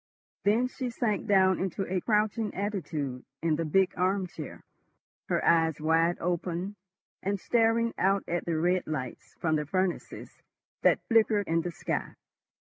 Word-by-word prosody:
Then 225 +5 +3
she 255 0 -4
sank 225 -3 -1
down 190 -2 +4
into 190 +1 -2
a 185 0 -1
crouching 215 +1 0
attitude 155 -10 -3 0.2
in 165 -2 +2
the 165 +2 -2
big 185 +4 +2
arm 185 +1 +1
chair, 160 -5 -9 0.7
her - - +1
eyes 160 -2 +3
wide 165 +2 +2
open 180 +3 -2 0.5
and 200 +1 -1
staring 230 +1 +2
out 195 +1 +2
at 175 +1 -2
the 165 -2 0
red 180 +3 +1
lights 130 -6 -5
from 160 -2 +1
the 150 - -2
furnaces 185 +2 -3 0.4
that - - +3
flickered 220 -3 +3
in 165 +1 +2
the 175 - -3
sky. 170 - -3
185 Hz, 150 wpm, -29 LUFS, 165-205 Hz, 0.7 s, down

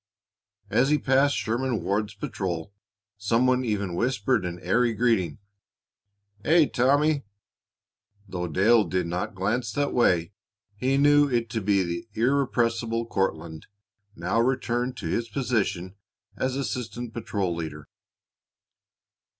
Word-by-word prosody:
As 135 +3 +3
he 150 - +4
passed 135 +1 +3
Sherman 120 0 -1
Ward's 105 +1 -1
patrol 95 -2 -4 0.5
some 115 +4 +2
one 130 0 +2
even 100 -6 -2
whispered 115 +1 0
an 90 0 -4
airy 115 +7 +2
greeting, 110 -9 +1 1.1
"Aye, 160 +2 +4
Tommy." 145 +4 +3 1.1
Though 90 -2 -3
Dale 105 +7 +4
did 90 +1 -1
not 90 +3 -3
glance 105 +4 -1
that 145 0 0
way, 90 -7 +2 0.4
he 130 +5 +1
knew 145 0 +5
it 115 -3 -1
to 110 - -2
be 100 -1 +2
the 85 +4 -4
irrepressible 115 -2 +1
Courtlandt, 85 -7 -3 0.5
now 90 +7 0
returned 125 0 -1
to - - -7
his 115 0 -1
position 105 -7 -1 0.4
as 130 0 -1
assistant 120 -3 -4
patrol 100 -6 -2
leader. 75 -3 -6
115 Hz, 120 wpm, -26 LUFS, 95-130 Hz, 1.1 s, knew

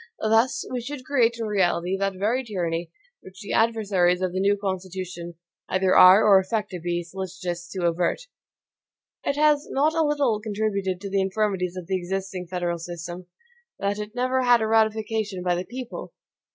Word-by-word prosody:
Thus, 225 +3 +2
we 250 -1 -2
should 260 +1 -7
create 240 -5 +2
in 230 - -3
reality 185 -3 +1
that 195 0 -1
very 225 +7 0
tyranny 175 -6 -3 0.3
which 190 0 -14
the 205 - -5
adversaries 200 -6 +2
of 185 -1 -1
the 185 - -1
new 200 +1 +2
Constitution 185 -3 -5 0.3
either 185 0 +2
are, 185 +4 +8
or 200 -2 +7
affect 205 +2 -2
to 180 - -5
be, 175 +1 -2
solicitous 175 -1 -6
to 185 -3 -3
avert. 170 - 0 1.0
It 280 - 0
has 300 0 +3
not 300 +4 +2
a 325 - +1
little 290 -8 +1
contributed 200 -3 -2
to 200 - -5
the 195 0 +2
infirmities 190 -2 -1
of 180 - -6
the 190 +2 0
existing 185 0 -4
federal 175 -1 -2
system, 175 +1 -7 0.5
that 200 +1 -2
it 210 +2 -6
never 255 +1 +1
had 245 -1 +5
a - - +1
ratification 220 -3 0
by 180 -1 +1
the 180 +1 -2
PEOPLE. 250 +2 -7
195 Hz, 175 wpm, -25 LUFS, 180-225 Hz, 1.0 s, are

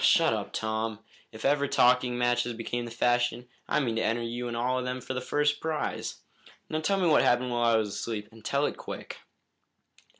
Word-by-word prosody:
"Shut - - +5
up, - - -3
Tom. 110 0 -2 0.3
If 110 0 -8
ever 145 +1 +3
talking 125 -1 +3
matches 120 0 +1
become 120 +1 -3
the - - -6
fashion, 120 +1 +1 0.2
I - - +3
mean 120 -6 -1
to - - +1
enter 115 +1 0
you 120 +1 -3
in 120 - -4
all 125 +2 0
of - - -3
them 125 0 -3
for 125 - -5
the 130 - -3
first 145 +2 +1
prize. 160 -1 -3 0.5
Now, 155 - 0
tell 195 +5 +1
me 180 - +2
what 155 - +5
happened 125 +1 +2
while 120 -1 +3
I - - +5
was 110 -2 0
asleep, 105 0 -4
and 110 -1 -16
tell 140 +4 +1
it - - -2
quick!" - - -7
120 Hz, 210 wpm, -28 LUFS, 115-130 Hz, 0.5 s, Shut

